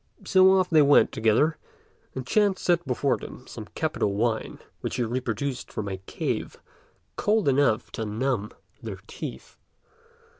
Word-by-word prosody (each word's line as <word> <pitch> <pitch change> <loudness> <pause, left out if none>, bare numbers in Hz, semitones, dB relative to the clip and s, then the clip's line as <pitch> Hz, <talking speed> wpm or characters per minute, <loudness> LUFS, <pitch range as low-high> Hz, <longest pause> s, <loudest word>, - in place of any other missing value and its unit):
So 190 0 +6
off 190 -1 +3
they 160 -3 +5
went 145 0 +5
together; 115 +9 +2 0.6
and 130 -1 -4
Ch'ên 205 +5 +2
set 175 -4 +1
before 130 +2 +1
them - - -10
some - - -9
capital 100 -1 -1
wine, 110 +1 -1 0.2
which - - -4
he 125 - 0
produced 125 +2 -4
from 105 - -4
a 95 -1 -3
cave, 95 - -4 0.6
cold 210 -4 +2
enough 130 -5 +2
to 115 - -4
numb 110 0 -1 0.3
their - - -6
teeth. - - -8
130 Hz, 145 wpm, -26 LUFS, 110-170 Hz, 0.6 s, So